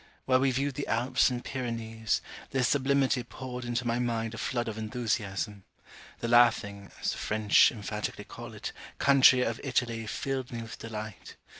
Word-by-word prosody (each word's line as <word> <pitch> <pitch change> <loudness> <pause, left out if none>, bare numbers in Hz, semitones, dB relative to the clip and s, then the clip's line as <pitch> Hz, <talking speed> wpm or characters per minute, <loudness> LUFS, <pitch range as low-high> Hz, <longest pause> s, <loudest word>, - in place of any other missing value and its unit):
While 130 -1 +4
we 135 +1 +3
viewed 135 +2 0
the 145 +2 -4
Alps 125 0 +2
and 125 -1 -4
Pyrenees, 115 -3 -2 0.3
their 135 -1 0
sublimity 135 0 +2
poured 125 +1 -7
into 120 0 -2
my 120 0 0
mind 115 -2 -1
a 115 - -6
flood 120 -2 -1
of 110 - -3
enthusiasm. 105 -3 -2 0.6
The 115 - -1
laughing 110 -4 +3
(as - - 0
the - - -5
French 110 -1 +4
emphatically 105 -1 -4
call - - -9
it) - - -5 0.3
country 130 -2 +6
of 115 -2 -2
Italy 120 -4 -1
filled 130 +2 -3
me 115 -1 -4
with 115 - -9
delight. 110 -8 -7
120 Hz, 165 wpm, -29 LUFS, 110-130 Hz, 0.6 s, country